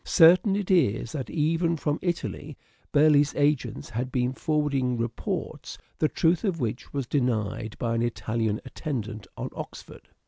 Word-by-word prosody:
Certain 185 Hz, +4 st, +6 dB
it 200 Hz, -2 st, -1 dB
is 125 Hz, -, +2 dB
that 135 Hz, -5 st, -4 dB
even 165 Hz, +2 st, +1 dB
from 150 Hz, 0 st, -1 dB
Italy 170 Hz, -4 st, -3 dB, 0.3 s
Burleigh's 145 Hz, -1 st, +4 dB
agents 145 Hz, -6 st, 0 dB
had 125 Hz, +3 st, -3 dB
been 125 Hz, 0 st, 0 dB
forwarding 140 Hz, -5 st, 0 dB
reports 115 Hz, 0 st, -4 dB, 0.2 s
the 155 Hz, -, +3 dB
truth 165 Hz, 0 st, +2 dB
of 185 Hz, -6 st, 0 dB
which 120 Hz, -1 st, -3 dB
was 140 Hz, -2 st, -2 dB
denied 110 Hz, -5 st, -1 dB
by 115 Hz, -1 st, -1 dB
an 115 Hz, -, 0 dB
Italian 110 Hz, -2 st, -1 dB
attendant 115 Hz, -, -5 dB
on -, -, -4 dB
Oxford. -, -, -9 dB
140 Hz, 145 wpm, -27 LUFS, 120-160 Hz, 0.3 s, Certain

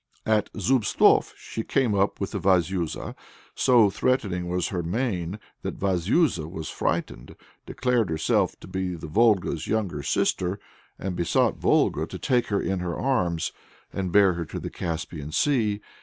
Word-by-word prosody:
At 110 Hz, -2 st, +1 dB
Zubtsof 110 Hz, +2 st, +3 dB
she 115 Hz, -, -5 dB
came 125 Hz, -1 st, +1 dB
up 100 Hz, 0 st, +1 dB
with 100 Hz, -, -3 dB
Vazuza. 90 Hz, -2 st, 0 dB, 0.4 s
So 115 Hz, -6 st, +4 dB
threatening 95 Hz, -9 st, 0 dB
was 90 Hz, 0 st, -1 dB
her 90 Hz, -3 st, -2 dB
mien, 95 Hz, -1 st, -2 dB, 0.2 s
that -, -, -5 dB
Vazuza 95 Hz, -, +1 dB
was 80 Hz, -2 st, -6 dB
frightened, -, -, -3 dB, 0.3 s
declared 125 Hz, -6 st, 0 dB
herself 80 Hz, -1 st, +1 dB
to -, -, -10 dB
be 95 Hz, -1 st, -3 dB
Volga's 90 Hz, 0 st, +1 dB
younger 100 Hz, -9 st, -1 dB
sister, 90 Hz, +6 st, 0 dB, 0.4 s
and 95 Hz, -1 st, -4 dB
besought 85 Hz, -1 st, +1 dB
Volga -, -, +2 dB
to -, -, -7 dB
take 125 Hz, -2 st, +1 dB
her 100 Hz, -1 st, 0 dB
in 95 Hz, -1 st, -1 dB
her 90 Hz, -1 st, -3 dB
arms 90 Hz, -11 st, 0 dB, 0.4 s
and 95 Hz, -2 st, -2 dB
bear 100 Hz, -1 st, +5 dB
her 85 Hz, -1 st, -4 dB
to -, -, -6 dB
the -, -, -6 dB
Caspian 80 Hz, -2 st, -5 dB
Sea. 110 Hz, -, +1 dB
95 Hz, 145 wpm, -25 LUFS, 85-110 Hz, 0.4 s, bear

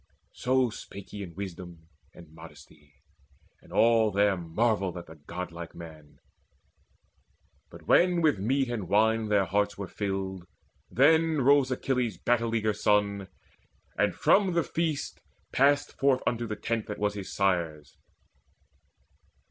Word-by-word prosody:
So 130 Hz, -1 st, +1 dB
spake 100 Hz, -2 st, -10 dB
he 105 Hz, -, -7 dB
in 85 Hz, -4 st, -8 dB
wisdom 90 Hz, -3 st, -8 dB, 0.3 s
and 85 Hz, -, -12 dB
in 80 Hz, -, -23 dB
modesty; 75 Hz, -1 st, -15 dB, 0.7 s
And -, -, -19 dB
all 115 Hz, -1 st, +4 dB
there 100 Hz, 0 st, +2 dB
marvelled 95 Hz, +2 st, -1 dB
at 85 Hz, -, -8 dB
the 80 Hz, -, -14 dB
godlike 85 Hz, -2 st, -7 dB
man. 80 Hz, -3 st, -12 dB, 1.5 s
But -, -, -13 dB
when 175 Hz, -1 st, +4 dB
with 150 Hz, -10 st, +3 dB
meat 130 Hz, +6 st, +1 dB
and 110 Hz, -7 st, -4 dB
wine 110 Hz, +1 st, +2 dB
their 100 Hz, -2 st, +3 dB
hearts 100 Hz, +3 st, 0 dB
were 100 Hz, -, -4 dB
filled, 95 Hz, -3 st, -4 dB, 0.4 s
Then 160 Hz, +3 st, +3 dB
rose 140 Hz, 0 st, +4 dB
Achilles' 125 Hz, -5 st, -1 dB
battle 115 Hz, +1 st, 0 dB
eager 110 Hz, -1 st, +1 dB
son, 100 Hz, -1 st, +1 dB, 0.7 s
And -, -, +1 dB
from 195 Hz, -3 st, +3 dB
the 170 Hz, -1 st, +2 dB
feast 160 Hz, -3 st, -3 dB, 0.3 s
passed 145 Hz, +2 st, +3 dB
forth 135 Hz, -2 st, +2 dB
unto 120 Hz, -1 st, -1 dB
the 110 Hz, -, -4 dB
tent 115 Hz, +1 st, -3 dB
That 105 Hz, -, -5 dB
was 105 Hz, 0 st, 0 dB
his 100 Hz, -2 st, -7 dB
sire's. 85 Hz, -7 st, -1 dB
105 Hz, 140 wpm, -28 LUFS, 90-125 Hz, 1.5 s, all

